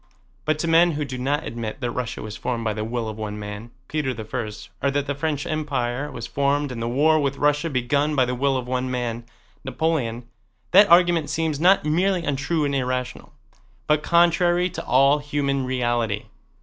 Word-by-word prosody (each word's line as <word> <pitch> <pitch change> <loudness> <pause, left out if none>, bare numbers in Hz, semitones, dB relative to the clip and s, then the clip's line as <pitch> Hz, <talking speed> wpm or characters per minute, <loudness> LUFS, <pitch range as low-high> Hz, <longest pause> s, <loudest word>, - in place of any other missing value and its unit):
But 155 0 +1
to 165 - -2
men 165 +1 +5
who 150 0 -2
do 130 -2 -6
not 140 +3 -1
admit 115 +1 -5
that 120 -3 -2
Russia 120 -1 -4
was 110 -1 -7
formed 120 -2 -3
by 110 -1 0
the 110 0 -3
will 115 0 -3
of 110 0 -6
one 105 -1 -4
man, 105 +2 -7 0.2
Peter 150 -3 -2
I, 110 0 -4 0.3
or 140 - +2
that 140 0 -1
the 145 - -2
French 145 0 -2
Empire 140 -3 -2
was 115 -2 -6
formed 140 +2 0
and 115 -2 -5
the 115 - -2
war 155 +5 +3
with 140 -1 -1
Russia 150 +3 +1
begun 140 +3 0
by 130 -2 +4
the 125 - -2
will 135 +1 +1
of 125 -1 -5
one 130 0 -1
man, 120 -2 -3 0.4
Napoleon, 125 -4 -2 0.4
that 200 +3 +7
argument 170 -3 +4
seems 160 -2 -1
not 185 +1 +4
merely 175 +3 +1
untrue 145 +3 0
and 140 - -1
irrational, 130 -1 -3 0.5
but 150 0 +2
contrary 175 +2 +3
to - - -6
all 140 +3 +4
human 140 -2 -1
reality. 120 -4 -1
140 Hz, 190 wpm, -23 LUFS, 120-155 Hz, 0.5 s, that